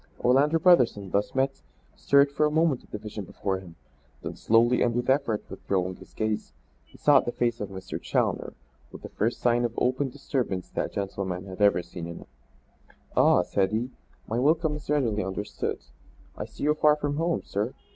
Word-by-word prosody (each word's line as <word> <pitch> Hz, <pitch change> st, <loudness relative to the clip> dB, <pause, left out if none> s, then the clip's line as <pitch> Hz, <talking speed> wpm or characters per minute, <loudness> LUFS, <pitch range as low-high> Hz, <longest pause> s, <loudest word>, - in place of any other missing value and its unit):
Orlando 140 Hz, +6 st, +4 dB
Brotherson, 125 Hz, -, +4 dB
thus 100 Hz, +4 st, 0 dB
met, 135 Hz, -, 0 dB, 0.3 s
stared 140 Hz, 0 st, +4 dB
for 150 Hz, +2 st, +2 dB
a -, -, 0 dB
moment 155 Hz, -3 st, +1 dB
at -, -, -22 dB
the -, -, -5 dB
vision 105 Hz, -1 st, -7 dB
before 95 Hz, +1 st, -3 dB
him, 90 Hz, -3 st, -13 dB, 0.5 s
then -, -, -5 dB
slowly 115 Hz, +2 st, +3 dB
and 120 Hz, -1 st, +2 dB
with 125 Hz, +2 st, +1 dB
effort 135 Hz, -6 st, 0 dB
withdrawing 95 Hz, -1 st, -2 dB
his -, -, -16 dB
gaze, 110 Hz, -, -2 dB, 0.3 s
he -, -, -19 dB
sought 145 Hz, -2 st, +5 dB
the 120 Hz, -, -1 dB
face 120 Hz, -1 st, -1 dB
of 105 Hz, -, -3 dB
Mr. 95 Hz, -1 st, -7 dB
Challoner -, -, -1 dB, 0.4 s
with -, -, -11 dB
the -, -, -7 dB
first 115 Hz, +3 st, -1 dB
sign 120 Hz, 0 st, +3 dB
of 120 Hz, -1 st, -2 dB
open 130 Hz, +2 st, +1 dB
disturbance 125 Hz, -8 st, -3 dB
that -, -, -3 dB
gentleman 95 Hz, -2 st, -3 dB
had 95 Hz, +1 st, -8 dB
ever 100 Hz, -3 st, +4 dB
seen 85 Hz, -1 st, -7 dB
in 85 Hz, -, -7 dB
him. -, -, -12 dB, 0.9 s
"Ah," 90 Hz, -, +5 dB
said 95 Hz, +1 st, +1 dB
he, 120 Hz, +4 st, -1 dB, 0.4 s
"my 115 Hz, +2 st, -1 dB
welcome 155 Hz, +3 st, +2 dB
is 150 Hz, -, -10 dB
readily 120 Hz, -9 st, +1 dB
understood. 95 Hz, +2 st, -3 dB, 0.6 s
I -, -, -5 dB
see -, -, -10 dB
you 150 Hz, +1 st, +4 dB
far 150 Hz, -1 st, +4 dB
from 145 Hz, -1 st, -2 dB
home, 165 Hz, +1 st, 0 dB
sir." 105 Hz, +5 st, -2 dB
120 Hz, 190 wpm, -27 LUFS, 100-140 Hz, 0.9 s, sought